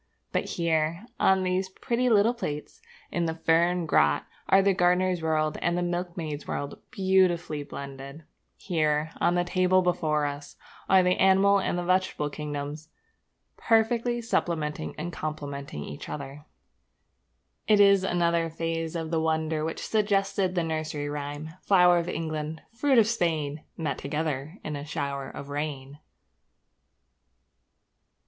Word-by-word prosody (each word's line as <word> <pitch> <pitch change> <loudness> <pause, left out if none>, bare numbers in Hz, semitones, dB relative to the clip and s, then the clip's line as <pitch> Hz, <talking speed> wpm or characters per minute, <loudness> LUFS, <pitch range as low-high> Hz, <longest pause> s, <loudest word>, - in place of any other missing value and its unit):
But - - 0
here, 165 +2 0
on 190 0 +4
these 185 +1 0
pretty 240 +6 -1
little 220 +1 +4
plates 150 -11 -6 0.3
in 170 -1 0
the 160 -1 -2
fern 170 +2 +2
grot 75 - +3 0.2
are 195 0 +6
the 195 0 +4
gardener's 180 0 +2
world 155 -1 0
and 175 +1 +1
the 175 - 0
milkmaid's 175 -4 -4
world 145 0 -4
beautifully 185 -5 +2
blended. 140 +1 -8 0.3
Here, 155 -3 0
on 175 - +3
the 175 - +2
table 185 +1 +2
before 155 -4 +1
us, 145 0 -6 0.3
are 190 -1 +6
the 180 0 +2
animal 195 +1 +5
and 185 - -1
the 175 - -2
vegetable 185 -5 0
kingdom 145 -1 -4 0.8
perfectly 235 +1 +2
supplementing 150 - -1
and 175 +3 -5
completing 140 - -5
each 75 - -8
other. 140 +1 -7 1.2
It 210 -1 +5
is 200 -1 +6
another 170 -2 +1
phase 165 0 -3
of 165 -1 -3
the 165 -1 +1
wonder 160 -1 0
which 160 +1 -4
suggested 195 -3 +1
the 175 - +1
nursery 155 -2 -3
rhyme: 145 +1 -5
Flour 180 -3 +5
of 170 +1 -3
England, 155 -1 -4
fruit 265 +2 +2
of 225 - +7
Spain, 160 -9 -1
Met 155 -4 -2
together 150 +2 -3
in 150 - -4
a 145 - -5
shower 140 -3 -4
of 140 - -9
rain. 145 -1 -5
165 Hz, 140 wpm, -27 LUFS, 150-185 Hz, 1.2 s, of